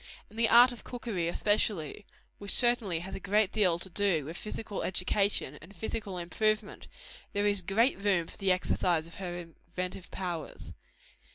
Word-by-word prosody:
In - - -15
the 230 0 +2
art 245 +2 +8
of 240 - -9
cookery 220 -8 -3
especially 205 -1 0 0.3
which 200 -1 +1
certainly 235 -9 +2
has 190 +2 -7
a - - -5
great 200 +1 +2
deal 185 -6 +3
to 180 - -6
do 185 -5 +1
with 160 +3 -7
physical 210 +1 -5
education 185 -5 0
and 195 +5 -14
physical 205 0 -4
improvement 215 +5 -1 0.5
there 205 0 0
is 205 -2 +2
great 200 +6 +2
room 195 -4 +2
for - - -14
the 195 -1 +1
exercise 180 -2 +1
of 165 - -10
her 180 -2 -4
inventive 175 +2 -7
powers. 175 -5 -6
195 Hz, 165 wpm, -30 LUFS, 175-215 Hz, 0.5 s, art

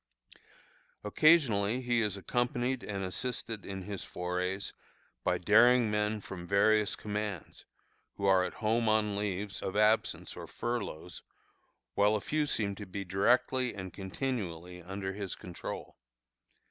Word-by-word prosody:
Occasionally 120 -3 +4
he 120 -2 +1
is 105 -3 -1
accompanied 120 +4 -1
and 100 -2 -3
assisted 110 +3 -4
in 95 -1 -5
his 100 0 -5
forays 90 +2 -3 0.5
by - - +2
daring 115 +3 +5
men 105 0 0
from 90 -3 -8
various 105 +2 +3
commands, 105 -4 -5 0.5
who 100 - -3
are 95 -1 +5
at - - -4
home 110 +1 +1
on 105 -1 +2
leaves 100 0 -3
of 95 - -4
absence 105 +1 +2
or - - -8
furloughs, 100 -8 -4 0.7
while 105 +1 +4
a - - +1
few 150 +7 0
seem 105 -7 0
to 105 - -7
be 100 +1 -5
directly 120 +6 +2
and 95 -2 -7
continually 95 -5 -4
under 95 +2 -4
his 100 -1 -4
control. 90 -1 -7
105 Hz, 135 wpm, -31 LUFS, 95-115 Hz, 0.7 s, daring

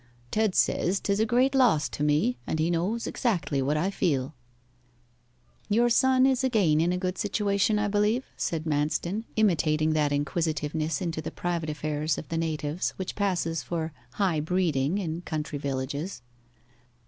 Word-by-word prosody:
Ted 215 -3 +1
says 190 +3 +2
'tis 200 0 0
a 220 - +2
great 255 +4 +3
loss 245 - +4
to - - -7
me, 145 -4 +2
and - - -1
he 160 +2 +1
knows 190 +8 -1
exactly 155 - -1
what 145 +3 +1
I 180 +6 0
feel.' 145 -7 0 1.4
'Your 235 +3 +3
son 260 +1 +4
is 265 -1 +2
again 195 -12 +3
in 170 +2 +2
a 180 - 0
good 185 0 -3
situation, 205 0 +1
I 210 0 +1
believe?' 210 +5 +1
said 160 -2 -2
Manston, 160 +7 -1
imitating 155 -7 +2
that 150 -2 +1
inquisitiveness 155 +1 -1
into 165 -2 -2
the 155 - -4
private 170 -3 -3
affairs 150 0 -1
of 155 - -7
the 165 - -2
natives 155 0 -2
which 190 -1 -4
passes 175 -6 -1
for 165 -1 -3 0.2
high 185 -6 +1
breeding 160 -1 0
in 170 -4 -3
country 150 -3 -4
villages. 140 +3 -4
165 Hz, 160 wpm, -27 LUFS, 150-205 Hz, 1.4 s, loss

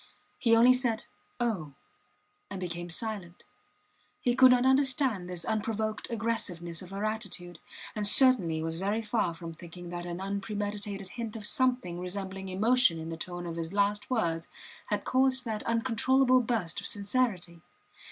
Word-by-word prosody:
He 230 -2 +4
only 240 +2 +7
said 245 -3 0 0.3
oh! 195 - -2 0.8
and 195 -1 -5
became 175 -1 -5
silent. 185 -2 -3 0.8
He 245 - +1
could 260 0 +8
not 250 0 +4
understand 260 -8 +2
this 175 -2 -2
unprovoked 220 0 -2
aggressiveness 185 -7 -2
of 185 - -10
her 200 +2 -3
attitude, 195 -6 -4 0.4
and 210 -1 0
certainly 200 - +5
was 165 0 -3
very 205 +4 -1
far 210 -6 0
from 165 -1 -8
thinking 175 +1 -10
that 175 0 -5
an 175 0 -5
unpremeditated 200 0 -4
hint 230 -1 -6
of 215 -2 -5
something 250 - +1
resembling 190 +1 -5
emotion 220 0 +4
in 160 0 -6
the 165 - -4
tone 175 +1 -6
of 170 -1 -5
his 165 +2 -4
last 205 +1 +1
words 170 -10 0 0.4
had - - -1
caused 260 0 +2
that 220 -2 -3
uncontrollable 255 +3 +3
burst 220 -8 -1
of - - -1
sincerity. 200 -5 -1
205 Hz, 150 wpm, -29 LUFS, 175-230 Hz, 0.8 s, could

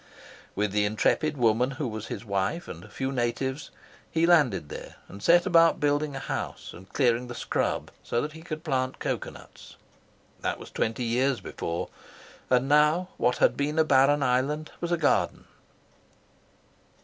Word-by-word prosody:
With 105 0 0
the 105 +1 +2
intrepid 145 +8 +1
woman 120 +1 +3
who 145 -4 -2
was 110 -1 -6
his - - -6
wife, 100 - -1
and 85 +1 -8
a - - -13
few 135 0 -3
natives, 130 +3 -2 0.4
he 165 +1 +2
landed 140 - +3
there, - - -8
and 100 - -11
set 175 +1 +5
about 165 -3 +5
building 145 0 0
a - - -3
house, - - -5
and 95 +3 -14
clearing 125 -2 +2
the 120 - -7
scrub - - -2
so 120 - -1
that 150 +4 -2
he 160 - -11
could 155 -2 -6
plant 130 -5 -1
cocoa - - -3
nuts. - - -14 0.6
That - - -2
was - - -11
twenty 115 +2 -1
years 125 +3 +1
before, 85 0 -4 0.6
and 125 +1 +3
now 150 +5 +3
what 125 0 +1
had - - +3
been 150 +2 -1
a 160 - +6
barren 140 0 +4
island 140 +4 0
was 170 0 -2
a 175 - +2
garden. 155 -3 +1
135 Hz, 170 wpm, -27 LUFS, 120-155 Hz, 0.6 s, a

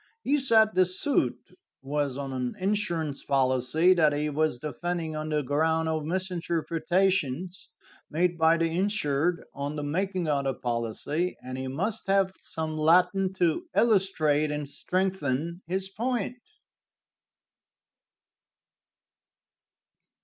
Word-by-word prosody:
He 290 +2 +2
said 220 -5 +4
the 185 -1 +4
suit 190 +10 0 0.5
was 140 -1 -1
on 135 -1 -4
an 125 -1 -3
insurance 175 -7 -1
policy; 135 +6 +3
that 155 -4 +3
he 150 +1 -1
was 155 -3 +1
defending 160 +4 -3
on 155 0 -4
the 150 -1 0
ground 160 +4 +1
of 155 -1 -1
misrepresentations 175 -1 -1 0.4
made 175 +3 +1
by 165 0 +4
the 165 - +1
insured 175 -3 0
on 140 +2 -4
the 150 - -3
making 180 +3 -1
of 140 -2 0
the 135 -1 0
policy, 120 +9 -2
and 130 0 -6
he 130 0 -4
must 190 +13 -3
have 195 -1 +2
some 160 -1 -4
Latin 180 +4 +4
to 180 - +1
illustrate 175 -9 +3
and 150 -1 -3
strengthen 170 -1 -2
his 190 +2 -1
point. 240 +3 -2
160 Hz, 120 wpm, -27 LUFS, 145-185 Hz, 0.5 s, said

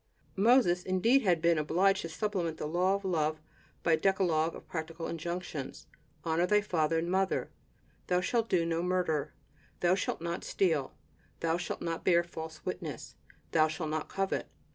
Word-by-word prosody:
Moses, 200 -4 +4
indeed, 190 +9 +3
had 175 -7 +2
been 170 -2 +4
obliged 185 +6 +2
to 165 - -5
supplement 175 -3 -2
the - - -4
law 180 +5 +2
of 200 0 -5
love 155 -4 0 0.4
by 170 - +2
a 160 - +5
decalogue 170 -3 +2
of - - -12
practical 165 0 -5
injunctions: 170 -3 -5 0.4
"Honor 165 +2 +1
thy 210 +2 +4
father 165 -5 +1
and 170 +2 -1
mother, 190 0 0 0.6
Thou 180 0 +2
shalt 230 +4 0
do 170 -3 +2
no 165 0 0
murder, 180 -5 0 0.5
Thou 175 0 +4
shalt 190 - -1
not 170 +1 -3
steal, 160 -8 0 0.5
Thou 165 0 +1
shalt 175 - -4
not 165 -1 -3
bear 170 -2 +4
false 160 -2 -8
witness, - - -5 0.4
Thou 155 -1 +4
shalt 155 0 -4
not 155 0 -2
covet." 195 0 -1
170 Hz, 165 wpm, -31 LUFS, 160-185 Hz, 0.6 s, a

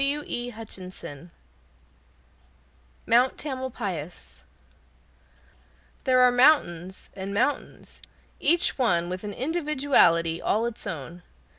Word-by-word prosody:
Mount 245 +3 +3
Tamalpais 230 - -5 1.6
There 255 -2 +4
are 250 0 +6
mountains 195 - +2
and 195 0 -6
mountains, 285 +7 -2 0.4
each 340 -1 +2
one 175 -9 +2
with 185 +2 -5
an 205 -1 -5
individuality 265 - +2
all 220 +2 +1
its 235 -2 -5
own. 170 0 -6
230 Hz, 80 wpm, -26 LUFS, 175-265 Hz, 1.6 s, are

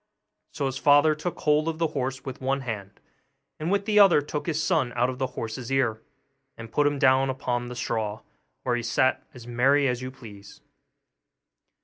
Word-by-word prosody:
So 140 - -3
his 135 0 -3
father 145 +2 +5
took 160 +3 -5
hold 150 +1 +2
of 165 -1 -2
the 165 -1 0
horse 135 0 -4
with 130 -1 -7
one 135 +1 0
hand, 105 -5 -6 0.6
and 160 +4 -2
with 200 0 +1
the 210 -1 +3
other 195 -6 +7
took 145 +2 -5
his 155 -1 0
son 155 -9 +1
out 125 +2 +1
of 130 - -9
the 130 - 0
horse's 115 +2 -5
ear, 125 -5 +1 0.6
and 115 0 -9
put 145 +4 +2
him 145 0 0
down 135 0 +4
upon 120 -2 -2
a 125 - -7
straw, 110 -3 -3 0.4
where 125 -1 0
he 120 - -2
sat 125 +3 +1
as 120 -2 -11
merry 135 +4 +3
as 125 -1 -1
you 130 - -5
please. 105 -6 -13
130 Hz, 195 wpm, -26 LUFS, 120-150 Hz, 0.6 s, other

